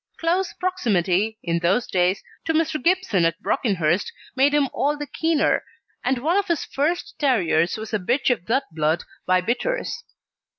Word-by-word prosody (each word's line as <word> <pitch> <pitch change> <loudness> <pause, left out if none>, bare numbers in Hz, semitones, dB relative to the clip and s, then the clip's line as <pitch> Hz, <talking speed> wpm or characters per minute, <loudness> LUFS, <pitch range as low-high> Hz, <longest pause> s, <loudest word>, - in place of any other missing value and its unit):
Close 350 +2 0
proximity, 215 - 0
in 170 -1 0
those 190 +8 +2
days, 185 +1 +1 0.2
to 320 - 0
Mr. 310 -3 0
Gibson 355 - +2
at 165 +2 +1
Brockenhurst 185 -5 0 0.2
made 270 +2 +4
him 290 -1 +3
all 295 +1 0
the 295 - -4
keener, 320 +1 +1 0.4
and 255 +1 +1
one 320 +9 +1
of 405 - +1
his 340 -3 0
first 315 +6 -2
terriers 185 - +2
was 220 +1 -7
a 215 - +1
bitch 245 +8 +1
of 210 -8 -2
that 265 +4 +2
blood 155 +1 0 0.2
by 185 0 +4
Bitters. 470 - -2
245 Hz, 165 wpm, -23 LUFS, -, 0.4 s, made